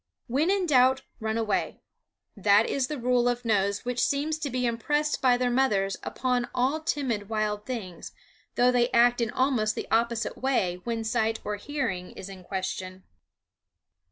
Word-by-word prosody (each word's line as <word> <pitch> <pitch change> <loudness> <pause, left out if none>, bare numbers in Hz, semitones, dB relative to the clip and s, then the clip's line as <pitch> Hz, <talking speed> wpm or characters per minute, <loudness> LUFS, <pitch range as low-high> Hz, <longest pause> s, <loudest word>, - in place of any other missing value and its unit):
When 280 +8 +1
in 390 -1 +2
doubt 265 -3 +4 0.2
run 220 0 -2
away 215 -3 -1 0.5
that 205 +1 +4
is 270 -2 -1
the 300 - -4
rule 245 0 +2
of 245 0 -3
nose 200 -1 +1
which 245 0 -2
seems 295 +4 0
to 295 - -3
be 250 0 -1
impressed 295 +6 0
by 250 -2 +4
their 250 0 0
mothers 205 -7 +1
upon 250 -2 -1
all 265 +5 +1
timid 255 -10 -2
wild 210 -1 -2
things, 200 -9 -6 0.4
though 250 +1 +4
they 245 -1 +2
act 240 +1 +4
in 230 - 0
almost 235 -4 +1
the - - -5
opposite 230 +1 0
way 190 -10 0
when 230 -1 -2
sight 225 0 0
or 210 0 -3
hearing 205 -8 -3
is 195 - -9
in 190 -2 -10
question. 185 0 -5
240 Hz, 165 wpm, -27 LUFS, 210-260 Hz, 0.5 s, doubt